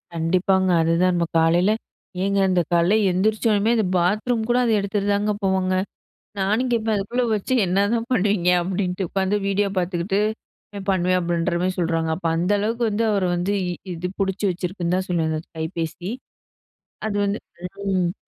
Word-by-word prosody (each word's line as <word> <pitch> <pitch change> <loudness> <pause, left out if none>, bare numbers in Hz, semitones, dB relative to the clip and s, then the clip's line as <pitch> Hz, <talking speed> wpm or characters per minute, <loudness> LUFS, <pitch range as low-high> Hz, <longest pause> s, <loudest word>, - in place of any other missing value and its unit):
கண்டிப்பாங்க. 185 +3 +2
அதுதான் 170 +3 +2
நம்ம 170 -1 +1
காலையில, 170 +5 +3 0.5
ஏங்க 200 0 +1
இந்த 180 -1 +3
காலையில 170 +5 +4 0.2
எந்திரிச்சோனம்மே, 215 +3 +2
அந்த 215 - +2
பாத்ரூம் 215 +6 +1
கூட 245 - +3
அத 235 - +2
எடுத்துட்டு 200 0 -1
தாங்க 205 +1 +1
போவாங்க. 190 -1 +1 0.6
நானும் 215 +7 +1
கேப்பேன், 220 -2 +1
அதுக்குள்ள 235 +5 -1
வச்சு 210 +5 -2
என்னதான் 205 +6 0
பண்ணுவீங்க? 195 -4 +2
அப்பிடின்ட்டு 185 0 -2
உட்காந்து 195 +1 0
வீடியோ 200 0 +1
பார்த்துக்கிட்டு 180 +2 0 0.7
பண்ணுவேன். 185 0 +2
அப்பிடின்ற 170 0 -1
மாரி 185 0 0
சொல்றாங்க. 165 -1 0
அப்ப 170 -1 -3
அந்த 180 +4 0
அளவுக்கு 230 +3 -1
வந்து 215 +2 0
அவர 200 -2 +1
வந்து 180 +4 -1 0.4
இது 175 +2 -4
பிடிச்சு 195 +2 -1
வச்சிருக்குன்னு 180 0 -2
தான் 190 - -3
சொல்லுவேன். 165 -2 0
அந்த 155 - -2 0.2
கைபேசி 165 +3 -4 1.0
அது 205 -1 -2
வந்து 200 +2 -1 0.5
ம். 180 -1 +1
190 Hz, 150 wpm, -22 LUFS, 175-205 Hz, 1.0 s, காலையில